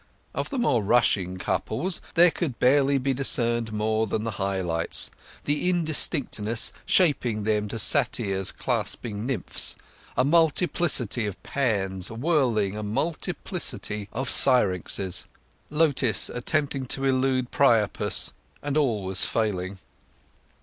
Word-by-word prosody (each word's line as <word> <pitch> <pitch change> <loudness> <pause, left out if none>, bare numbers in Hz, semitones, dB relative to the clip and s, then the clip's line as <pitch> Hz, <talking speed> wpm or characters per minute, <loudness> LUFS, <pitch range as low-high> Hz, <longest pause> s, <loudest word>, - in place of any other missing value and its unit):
Of - - -3
the 275 - -4
rushing 110 - +2
couples 115 - -2
there 175 +1 +6
could 155 -9 -4
barely 140 +2 +3
be 135 +1 0
discerned 120 -3 +1
more 110 +1 0
than 105 +1 -2
the 115 - -3
high 95 0 -1
lights—the 90 - -1
indistinctness 140 -9 0 0.2
shaping 125 - +2
them 105 0 0
to 110 - -5
satyrs 95 -4 +3
clasping 110 0 -3
nymphs—a 125 0 -4
multiplicity 150 - +1
of 100 - -8
Pans 95 -8 -1
whirling 115 - 0
a 105 - -4
multiplicity 105 -4 -3
of 130 +3 -3
Syrinxes; 95 - +2 0.4
Lotis 145 -8 +1
attempting 135 +1 -1
to 135 +2 -2
elude 130 -1 +1
Priapus, 115 -7 +2 0.3
and 145 0 -1
always 105 -10 0
failing. 100 -4 -2
120 Hz, 110 wpm, -25 LUFS, 105-140 Hz, 0.4 s, there